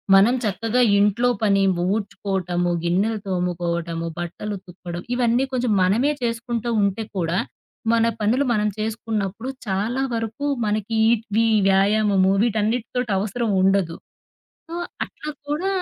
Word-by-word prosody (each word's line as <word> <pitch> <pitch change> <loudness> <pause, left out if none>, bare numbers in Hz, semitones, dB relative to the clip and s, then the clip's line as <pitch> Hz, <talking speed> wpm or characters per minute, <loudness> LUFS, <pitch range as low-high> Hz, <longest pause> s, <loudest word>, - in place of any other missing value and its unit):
మనం 210 +6 +6
చక్కగా 225 +4 0 0.2
ఇంట్లో 210 +4 +3 0.2
పని 200 -2 +3 0.3
ఊడ్చుకోవటము, 190 -4 -1
గిన్నెలు 200 +6 +1
తోముకోవటము, 170 -2 -2
బట్టలు 175 +5 -4
ఉతుక్కొడం 175 -2 -8
ఇవన్నీ 245 +1 +2
కొంచెం 250 -3 0
మనమే 225 +11 +3
చేసుకుంటా 235 0 -2
ఉంటే 200 +2 0
కూడా, 170 +1 0 0.5
మన 230 0 +3 0.2
పనులు 240 +7 +2
మనం 210 -1 +1
చేసుకున్నప్పుడు 220 +1 -3 0.2
చాలా 210 +7 -1
వరకు 225 +4 -3 0.2
మనకి 210 +1 -1
ఈట్ 230 -1 +3
ఇవి 225 +2 +3 0.2
వ్యాయామము 195 0 +3
వీటన్నిటితోటి 230 +1 0
అవసరం 220 +3 -2
ఉండదు. 190 -3 +2 0.7
సో, 335 - -6 0.3
అట్ల - - -12 0.2
కూడా 320 +6 -1
210 Hz, 120 wpm, -22 LUFS, 190-230 Hz, 0.7 s, మనం